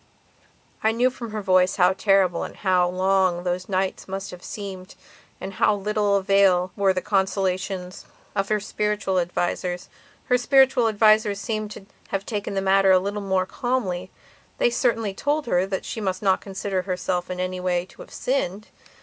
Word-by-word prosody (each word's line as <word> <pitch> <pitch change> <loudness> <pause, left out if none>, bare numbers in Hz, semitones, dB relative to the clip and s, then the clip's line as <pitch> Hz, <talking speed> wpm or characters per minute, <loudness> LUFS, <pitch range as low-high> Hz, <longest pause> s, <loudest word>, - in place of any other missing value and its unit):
I 220 - +4
knew 250 +3 +2
from 240 -2 -7
her 215 -1 -4
voice 185 -1 +3
how 180 -1 +4
terrible 190 -3 +2
and - - -6
how 185 -3 +2
long 185 -1 +1
those 180 +1 -3
nights 190 0 -1
must 195 +1 -5
have 180 0 -11
seemed 195 -2 -7 0.4
and 190 - -6
of 190 - -14
how 210 - +4
little 205 0 0
avail 190 -2 +3
were 200 -1 +3
the 185 -1 -2
consolations 190 -2 -1 0.3
of 195 -1 -1
her 215 0 +2
spiritual 210 -2 -1
advisers. 175 +1 -2 0.4
Her 250 -1 +2
spiritual 265 -2 +4
advisers 215 -1 +3
seemed 215 0 -3
to 195 - -12 0.2
have 195 0 -3
taken 205 -3 -4
the 195 - 0
matter 195 0 +4
a 190 - +7
little 200 +3 -2
more 190 -2 0
calmly. 190 -7 -2 0.5
They 240 - +2
certainly 230 -5 0
told 290 +8 -1
her 185 -5 +1
that 195 -1 -3
she 225 - -5
must 190 -1 -2
not 190 -2 +3
consider 195 -1 -3
herself 180 -1 -2
in 180 0 -4
any 185 0 -2
way 180 -1 0
to - - -15
have - - -12
sinned. 210 -6 -2
195 Hz, 175 wpm, -24 LUFS, 185-210 Hz, 0.5 s, a